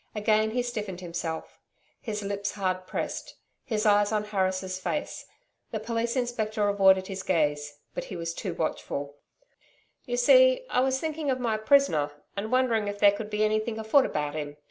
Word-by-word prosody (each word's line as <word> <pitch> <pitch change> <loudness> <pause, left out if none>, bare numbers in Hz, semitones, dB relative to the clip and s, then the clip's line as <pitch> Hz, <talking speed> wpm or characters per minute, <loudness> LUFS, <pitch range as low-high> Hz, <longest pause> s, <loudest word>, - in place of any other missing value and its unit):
Again 215 0 +2
he 245 +2 -1
stiffened 210 -7 -4
himself; 170 -2 -5 0.4
his 210 -3 -4
lips 200 0 -3
hard 185 -2 -2
pressed; - - -4 0.3
his 215 -1 -2
eyes 205 0 +4
on 210 -1 +1
Harris' 190 -2 -1
face. 295 +10 -4 0.4
The 220 - -3
Police 230 +2 -2
Inspector 220 -4 0
avoided 190 -2 +4
his 195 0 -5
gaze; 145 -4 0 0.2
but - - -4
he - - -7
too - - -6
was 170 +2 -4
watchful. 145 -2 -3 0.9
'You - - -1
see - - +6
I - - +2
was 265 +1 +2
thinking 310 -1 -3
of 255 -1 0
my 230 -3 0
prisoner, 215 - +3 0.3
and 205 +2 -4
wondering 240 -5 +2
if 205 0 -3
there 205 0 +6
could 210 +1 -5
be 210 0 0
anything 215 +1 0
afoot 220 +5 +3
about 150 -1 -2
him. 145 -1 -5
210 Hz, 170 wpm, -27 LUFS, 185-235 Hz, 0.9 s, see